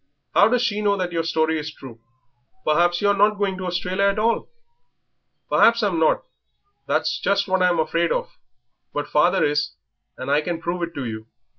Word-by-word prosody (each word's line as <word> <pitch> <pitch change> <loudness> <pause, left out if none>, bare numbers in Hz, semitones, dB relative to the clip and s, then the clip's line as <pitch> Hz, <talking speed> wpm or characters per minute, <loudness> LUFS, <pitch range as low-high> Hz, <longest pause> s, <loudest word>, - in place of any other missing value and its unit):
"How 205 - +6
does 250 +1 +1
she 210 -4 -1
know 200 -1 +2
that 180 -2 -2
your 165 -1 0
story 160 -1 0
is 150 +1 -5
true? 120 -6 -13 0.6
Perhaps 175 +3 +2
you 205 - +4
are - - +4
not 205 +1 +3
going 200 -2 -1
to 185 - -4
Australia 180 +2 -1
at 200 0 +1
all." 230 +2 0 1.0
"Perhaps 230 0 +4
I'm 190 -5 +1
not 160 - +2 0.6
that's - - 0
just 200 0 +1
what 190 -1 +1
I'm 180 -1 +3
afraid 165 +1 0
of; - - -2 0.6
but 145 - -2
father 175 +5 +2
is, 150 0 -1 0.4
and 130 +2 -4
I 145 +1 +3
can 170 +1 -3
prove 170 +1 -3
it 170 0 -4
to 140 - -4
you. 110 -1 -6
175 Hz, 190 wpm, -22 LUFS, 160-200 Hz, 1.0 s, How